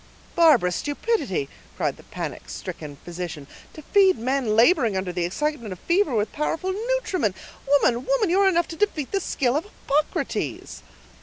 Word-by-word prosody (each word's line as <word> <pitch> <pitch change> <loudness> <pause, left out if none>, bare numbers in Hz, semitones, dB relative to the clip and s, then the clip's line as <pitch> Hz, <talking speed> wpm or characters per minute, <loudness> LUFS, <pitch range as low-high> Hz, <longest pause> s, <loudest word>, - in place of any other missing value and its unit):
"Barbarous 275 - +5
stupidity!" 290 - -1 0.3
cried - - -1
the - - -14
panic - - -6
stricken 145 -2 -7
physician, 170 -4 -6 0.3
"to 310 - -11
feed 385 +2 +4
men 250 -2 0
laboring 230 - +4
under 190 -1 -2
the 175 -1 -1
excitement 255 - -2
of 185 - -6
fever 340 - +1
with 210 0 0
powerful 325 +5 -1
nutriment. 405 - -1 0.3
Woman, 260 -4 +3
woman, 470 -8 +2
you 375 - +3
are 395 -1 +5
enough 340 -2 +1
to 330 - -6
defeat 325 -7 -1
the 395 - +1
skill 260 -6 0
of 310 - 0
Hippocrates!" 300 -7 -2
285 Hz, 160 wpm, -24 LUFS, -, 0.3 s, Barbarous